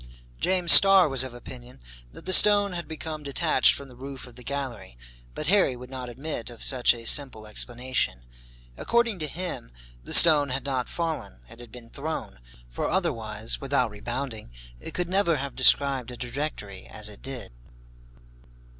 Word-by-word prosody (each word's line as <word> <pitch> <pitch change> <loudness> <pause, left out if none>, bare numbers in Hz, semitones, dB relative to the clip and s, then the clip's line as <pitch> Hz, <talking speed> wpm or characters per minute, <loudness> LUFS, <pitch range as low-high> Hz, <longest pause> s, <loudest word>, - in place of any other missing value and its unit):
James 180 -2 +2
Starr 195 -3 +9
was 135 -3 +3
of 130 - -7
opinion 120 - -12 0.3
that - - -13
the 185 - +1
stone 205 -1 +5
had 170 -1 -6
become 160 -1 -7
detached 150 +3 +2
from 140 - -9
the 125 - -15
roof 135 +1 -9
of 125 - -14
the 125 +1 -14
gallery; 120 - -6 0.4
but 150 - -5
Harry 180 -6 +2
would 125 +1 -12
not 130 -2 -6
admit 130 -1 -6
of 120 -2 -7
such 125 -2 +3
a 115 -1 -11
simple 130 -5 +3
explanation. 115 - -2 0.5
According 235 -4 0
to 155 - -2
him, 175 - -6 0.3
the - - -11
stone 150 -4 +7
had 130 +2 -4
not 130 -3 -3
fallen, 160 - -5
it - - -13
had 120 -2 -13
been 115 -1 -13
thrown; 140 - -6 0.3
for - - -4
otherwise, 115 - -2
without 135 -4 0
rebounding, 115 - -6 0.3
it - - -10
could 180 -1 -1
never 185 -2 +1
have 140 0 -6
described 135 -1 +2
a 125 - -9
trajectory 120 -7 -6
as 105 - -7
it 105 -1 -12
did. 135 -3 -8
130 Hz, 170 wpm, -25 LUFS, 120-155 Hz, 0.5 s, Starr